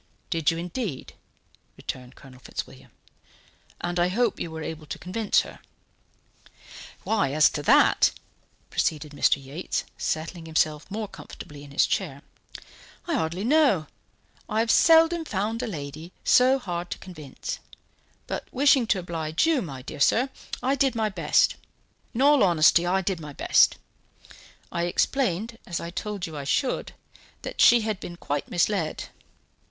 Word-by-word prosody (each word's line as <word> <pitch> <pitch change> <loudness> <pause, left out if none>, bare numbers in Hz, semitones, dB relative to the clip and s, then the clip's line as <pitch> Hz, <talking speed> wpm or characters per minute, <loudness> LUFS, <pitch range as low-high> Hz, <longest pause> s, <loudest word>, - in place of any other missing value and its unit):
"Did 165 -3 +2
you 165 - -1
indeed?" 175 - -5 0.6
returned 125 0 -7
Colonel 130 -2 -15
Fitzwilliam. 65 - -8 0.9
"And 175 0 -2
I 175 - +4
hope 225 +4 0
you 170 - -3
were 160 0 -6
able 155 -1 -6
to - - -5
convince 205 +5 +1
her." - - -11 1.4
"Why, 170 -12 +1
as 155 0 +5
to 145 - -3
that," - - +5 0.6
proceeded 150 -1 -1
Mr. 145 - +3
Yates, 140 +6 -4 0.2
settling 165 +1 -3
himself 155 -1 0
more 215 +1 -4
comfortably 145 -6 -11
in 145 - -12
his 140 - +3
chair, - - -2 0.8
"I 345 - -2
hardly 180 - -1
know; 260 - +3 0.6
I 215 +1 +1
have 225 -1 +2
seldom 330 0 +5
found 220 -2 -2
a 250 - -3
lady 155 -1 -7
so 255 +2 +5
hard 175 -7 -5
to - - -4
convince. 155 -7 -7 0.7
But - - -5
wishing 270 -2 +4
to 205 - +2
oblige 165 - -1
you, 320 -5 +2
my 135 -6 -7
dear 145 - -8
sir, 245 - +3 0.3
I 265 +2 +2
did 275 -2 +1
my 220 -1 +1
best; 170 -6 +2 0.6
in 255 - +2
all 290 -1 +6
honesty, 170 -1 +5
I 190 +2 +2
did 190 -1 -2
my 150 -2 -8
best. - - +4 0.9
I 170 0 -1
explained, 225 +2 0
as 175 - -3
I 170 - -6
told 205 0 -4
you 160 -3 -8
I 145 - -5
should, 250 - -1 0.5
that - - -3
she 240 -1 +7
had 215 -3 -2
been 175 - -7
quite 145 -4 -3
misled. 175 -2 0
175 Hz, 150 wpm, -26 LUFS, 155-225 Hz, 1.4 s, she